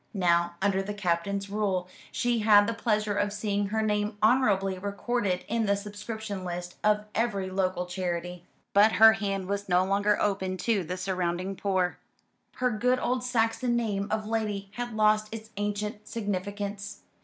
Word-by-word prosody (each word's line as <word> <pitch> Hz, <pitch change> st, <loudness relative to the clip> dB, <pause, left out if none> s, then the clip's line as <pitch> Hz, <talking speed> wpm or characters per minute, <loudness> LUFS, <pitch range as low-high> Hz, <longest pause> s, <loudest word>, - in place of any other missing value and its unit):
Now, 170 Hz, -2 st, +2 dB
under 195 Hz, -1 st, +2 dB
the 205 Hz, +1 st, -5 dB
Captain's 195 Hz, +1 st, -1 dB
rule, 195 Hz, -3 st, -1 dB, 0.2 s
she 240 Hz, -1 st, 0 dB
had 210 Hz, -1 st, +6 dB
the 230 Hz, -, -1 dB
pleasure 215 Hz, -2 st, 0 dB
of 205 Hz, 0 st, 0 dB
seeing 205 Hz, -1 st, -1 dB
her 220 Hz, +2 st, 0 dB
name 210 Hz, 0 st, 0 dB
honourably 205 Hz, -6 st, +3 dB
recorded 200 Hz, -1 st, -1 dB
in 225 Hz, -1 st, 0 dB
the 200 Hz, -, +3 dB
subscription 205 Hz, 0 st, -6 dB
list 175 Hz, 0 st, -5 dB
of 210 Hz, 0 st, +2 dB
every 200 Hz, -5 st, -1 dB
local 185 Hz, -1 st, 0 dB
charity: 180 Hz, -1 st, -4 dB, 0.3 s
but 210 Hz, +2 st, +6 dB
her 220 Hz, +4 st, +8 dB
hand 195 Hz, -3 st, -2 dB
was 200 Hz, 0 st, -3 dB
no 180 Hz, 0 st, +4 dB
longer 205 Hz, +2 st, +2 dB
open 190 Hz, -2 st, 0 dB
to 210 Hz, -2 st, +1 dB
the 180 Hz, +3 st, -4 dB
surrounding 185 Hz, 0 st, -2 dB
poor, 185 Hz, -2 st, 0 dB, 0.6 s
her 250 Hz, 0 st, +1 dB
good 250 Hz, +4 st, +2 dB
old 250 Hz, 0 st, -1 dB
Saxon 240 Hz, 0 st, +1 dB
name 205 Hz, -4 st, -1 dB
of 215 Hz, 0 st, -1 dB
Lady 210 Hz, -3 st, -2 dB
had 240 Hz, 0 st, -5 dB
lost 215 Hz, 0 st, +3 dB
its 220 Hz, -1 st, -8 dB
ancient 210 Hz, +1 st, -3 dB
significance. 200 Hz, -1 st, -4 dB
205 Hz, 160 wpm, -28 LUFS, 190-220 Hz, 0.6 s, her